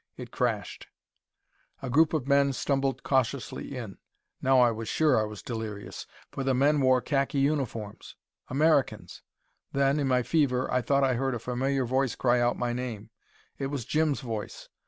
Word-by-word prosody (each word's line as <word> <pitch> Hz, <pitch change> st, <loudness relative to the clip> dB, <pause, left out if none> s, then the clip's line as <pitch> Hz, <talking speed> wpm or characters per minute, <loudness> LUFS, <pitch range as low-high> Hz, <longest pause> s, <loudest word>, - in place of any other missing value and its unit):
It -, -, -8 dB
crashed. -, -, -2 dB, 1.0 s
A 130 Hz, -, -3 dB
group 160 Hz, +4 st, +4 dB
of 140 Hz, -4 st, -2 dB
men 140 Hz, -1 st, +3 dB
stumbled 135 Hz, 0 st, -1 dB
cautiously 135 Hz, 0 st, -1 dB
in. 110 Hz, -6 st, -7 dB, 0.4 s
Now 130 Hz, 0 st, +4 dB
I 120 Hz, -1 st, +5 dB
was 115 Hz, 0 st, -5 dB
sure 150 Hz, -7 st, +3 dB
I -, -, 0 dB
was 105 Hz, -1 st, -8 dB
delirious. 110 Hz, -4 st, -6 dB, 0.2 s
For 135 Hz, -, -4 dB
the 135 Hz, -1 st, +1 dB
men 145 Hz, +3 st, +3 dB
wore 130 Hz, -1 st, +4 dB
khaki 140 Hz, 0 st, -1 dB
uniforms! 135 Hz, -7 st, -2 dB, 0.3 s
Americans! 145 Hz, +1 st, +1 dB, 0.5 s
Then, 140 Hz, +1 st, +2 dB
in 140 Hz, -, 0 dB
my 125 Hz, -1 st, +2 dB
fever, 130 Hz, -4 st, +1 dB
I 125 Hz, -, +2 dB
thought 140 Hz, +2 st, +2 dB
I 130 Hz, -1 st, +3 dB
heard 130 Hz, +1 st, -1 dB
a -, -, -4 dB
familiar 130 Hz, +3 st, -1 dB
voice 130 Hz, 0 st, 0 dB
cry 125 Hz, -1 st, +2 dB
out 120 Hz, 0 st, +1 dB
my 120 Hz, -1 st, -1 dB
name. 120 Hz, -4 st, -5 dB, 0.5 s
It 135 Hz, -, -1 dB
was 135 Hz, -4 st, -4 dB
Jim's 155 Hz, 0 st, +1 dB
voice. 110 Hz, -5 st, -6 dB
130 Hz, 170 wpm, -28 LUFS, 120-140 Hz, 1.0 s, I